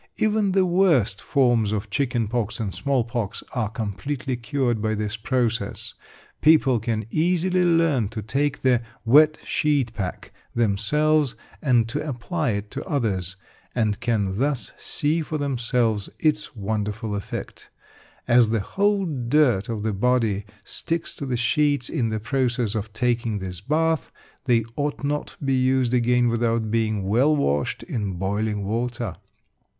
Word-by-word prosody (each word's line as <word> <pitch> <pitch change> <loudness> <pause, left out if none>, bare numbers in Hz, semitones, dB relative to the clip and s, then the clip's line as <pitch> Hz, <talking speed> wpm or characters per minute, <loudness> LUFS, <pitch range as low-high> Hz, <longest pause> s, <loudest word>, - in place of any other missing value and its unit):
Even 215 -3 +2
the 190 -1 +4
worst 165 - +3
forms 120 -7 +2
of 105 -1 -3
chicken 120 -3 0
pox 110 -1 -2
and 105 -4 -2
small 135 -3 +1
pox 115 -4 -4
are 110 -5 -1
completely 115 +5 -3
cured 120 -2 -1
by 110 0 0
this 105 0 -2
process. 115 -2 -1 0.5
People 150 -6 +5
can 110 -1 -2
easily 180 +2 +2
learn 165 - +3
to 110 -1 -6
take 140 +6 -1
the 125 -2 +4 0.2
"Wet 150 +6 +6
Sheet 140 -6 +1
Pack" 95 -4 -5 0.2
themselves, 120 +7 +2 0.3
and 120 -5 +3
to 145 +6 -3
apply 150 +2 -2
it 105 -1 -3
to 140 - -5
others, 100 - -1 0.4
and 110 -4 +1
can 105 -4 0
thus 135 -4 -1
see 155 +3 -1
for 155 0 -3
themselves 120 -6 0
its 155 -2 0
wonderful 105 0 -3
effect. 100 -1 -6 0.6
As 120 -2 +5
the 115 0 +1
whole 200 - +1
dirt 125 - +2
of 110 -2 -3
the 110 -1 0
body 110 -2 +1 0.2
sticks 165 +8 -3
to 140 - -4
the 125 -2 -1
sheets 145 +2 +1
in 125 -8 0
the 110 0 -2
process 120 -1 0
of 110 -1 -3
taking 115 -1 0
this 95 -3 -6
bath, 160 +6 0 0.3
they 120 -3 +3
ought 145 -1 -2
not 145 +1 -1
to - - -7
be 135 - +2
used 130 -1 +2
again 125 0 +3
without 115 -2 0
being 110 -3 0
well 130 +9 +4
washed 75 - 0
in 105 -5 -3
boiling 100 +3 -1
water. 115 -1 -2
120 Hz, 150 wpm, -24 LUFS, 110-145 Hz, 0.6 s, Wet